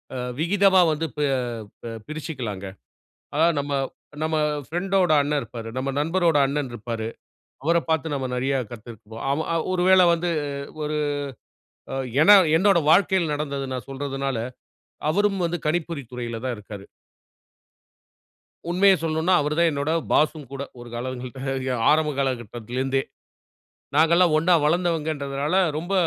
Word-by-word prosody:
அ - - -3 0.2
விகிதமா 190 +2 +4
வந்து 155 +1 -1
பெ 150 - +1 0.6
பெ 115 - -6 0.2
பிரிச்சுக்கலாங்க. 130 -10 -5 0.7
அதாவது, 165 +1 +3
நம்ம 145 0 -4 0.5
நம்ம 160 0 0 0.3
பிரெண்டோட 180 +1 +1
அண்ணன் 145 0 0
இருப்பாரு. 115 -4 -8
நம்ம 135 +1 -1
நண்பரோட 165 0 +2
அண்ணன் 140 -1 -2
இருப்பாரு. 115 0 -4 0.6
அவரைப் 170 +2 +1
பார்த்து 160 -1 0
நம்ம 135 -2 -2
நிறைய 135 +2 0
கத்திருக்கோம். 115 +5 -5 0.3
ஒரு 180 -1 +1
வேளை 185 -1 +7
வந்து 175 +1 -2 0.5
ஒரு 150 0 -2 1.0
அ - - -2 0.3
ஏன்னா 205 +3 +9 0.2
என்னோட 190 -1 +4
வாழ்க்கையில 185 -3 +3
நடந்தது 140 -2 -3
நான் 125 - -5
சொல்றதுனால, 135 -2 -3 0.7
அவரும் 200 +2 +1
வந்து 170 0 -2
கணிப்பொறித் 155 -5 -2
துறையில 120 -2 -5
தான் 125 -2 -1
இருக்காரு. 105 -1 -9 1.9
உண்மைய 195 +2 +5
சொல்லனும்ன்னா, 160 +3 +1
அவரு 150 +1 -1
தான் 170 -1 +4
என்னோட 145 +2 -1 0.2
பாஸும் 150 -3 +1
கூட. 140 0 -4 0.2
ஒரு 120 - -10
காலங்கள்ட்ட 130 +2 -4
ய 130 - 0 0.2
ஆரம்ப 155 0 +3
காலகட்டத்துலருந்தே. 130 +1 -2 0.9
நாங்கல்லாம் 165 +1 +5
ஒண்ணா 170 +3 +3
வளர்ந்தவங்கன்றதுனால, 155 -3 0 0.2
ரொம்ப 175 +5 -4
150 Hz, 125 wpm, -24 LUFS, 130-170 Hz, 1.9 s, ஏன்னா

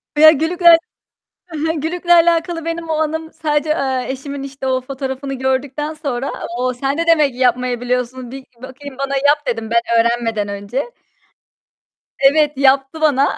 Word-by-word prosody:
Ya 310 +1 +8
gülükle 335 +2 +5 0.8
E - - -3
he. 320 - 0
Gülükle 345 +3 -1
alakalı 335 0 +2
benim 330 0 -4
o - - -1
anım 315 +1 -2
sadece, 300 -1 -1
eee, 265 -5 0
eşimin 275 +1 -5
işte 275 -1 -7
o 260 0 +1
fotoğrafını 270 +1 -5
gördükten 265 +3 -2
sonra, 275 -4 -3 0.3
o, 255 0 -1
sen 275 +4 -2
de 335 - 0
demek 305 -5 +3
yapmayı 250 -1 0
biliyorsun 250 0 -3
bir 265 0 -9 0.2
bakayım 265 +1 -10
bana 275 0 -2
yap 290 +1 +2
dedim, 225 -3 -3
ben 235 0 +3 0.2
öğrenmeden 230 -3 0
önce. 205 - -4 1.3
Evet, 290 +1 +3
yaptı 270 +3 +2
bana 285 -3 +2
275 Hz, 155 wpm, -18 LUFS, 255-310 Hz, 1.3 s, Ya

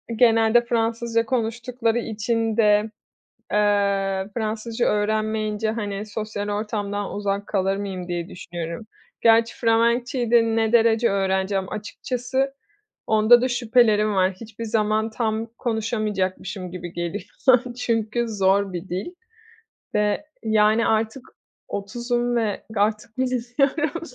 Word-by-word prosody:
genelde 225 0 +5
Fransızca 230 0 0
konuştukları 230 0 -1
için 225 0 -1
de, 210 -1 +3 0.6
eee, 200 -2 +1
Fransızca 225 +1 -2
öğrenmeyince, 215 0 0
hani, 210 -2 -4
sosyal 210 -1 -4
ortamdan 205 -1 -3
uzak 200 0 -2
kalır 195 -1 0
mıyım 190 -3 -5
diye 175 0 -3
düşünüyorum. 175 +2 -6 0.4
Gerçi 230 0 +4
Felemekçeyi 235 +1 +1
de 235 -1 +6
ne 225 0 +1
derece 230 0 +4
öğreneceğim 190 0 0
açıkçası 250 +5 -2 0.5
onda 220 +2 +6
da 255 - +2
şüphelerim 225 -3 +3
var. 190 0 +3
Hiçbir 230 0 -8
zaman 220 0 0
tam 220 0 -1
konuşamayacakmışım 210 -5 -2
gibi 175 -1 -7
geliyor 175 +3 -4 0.5
çünkü 230 -1 -1
zor 195 -2 +2
bir 175 +1 -6
dil. 185 +3 -3 0.9
Ve, 210 +8 +1 0.2
yani, 220 +1 +3
artık 220 +3 0 0.4
30'um 240 +4 -2
ve 220 -4 -1
artık 215 +2 0
bilmiyorum, 260 +5 0
220 Hz, 110 wpm, -23 LUFS, 205-230 Hz, 0.9 s, de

